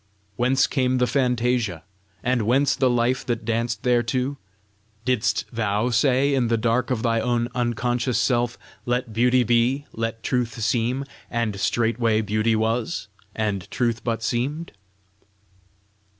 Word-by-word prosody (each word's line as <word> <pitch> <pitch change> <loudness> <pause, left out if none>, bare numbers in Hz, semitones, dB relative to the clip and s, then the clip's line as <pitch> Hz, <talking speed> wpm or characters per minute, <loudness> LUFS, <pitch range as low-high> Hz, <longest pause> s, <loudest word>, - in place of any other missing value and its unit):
Whence 130 +4 +3
came 130 -2 +1
the 125 - +3
fantasia? 125 - 0 0.4
and 125 -1 +1
whence 135 +3 +3
the 130 - +2
life 120 +1 +1
that 120 -2 -2
danced 115 -1 -1
thereto? 125 +3 0 0.7
Didst 125 -2 +1
THOU 110 +1 0
say, 130 +3 +3
in 130 -3 +2
the 115 0 +2
dark 115 +2 +1
of 125 -4 -1
thy 115 -1 +2
own 120 0 0
unconscious 120 0 0
self, 120 -2 +1 0.3
'Let 120 -1 -1
beauty 125 +2 +3
be; 120 +4 +2
let 115 0 -4
truth 120 -2 -1
seem!' 120 +4 0 0.2
and 115 -4 -2
straightway 115 0 +1
beauty 110 +2 +1
was, 110 -1 -1 0.3
and 105 -4 -2
truth 120 -1 -1
but 115 -1 -2
seemed?" 140 +8 -2
120 Hz, 135 wpm, -23 LUFS, 115-125 Hz, 0.7 s, Whence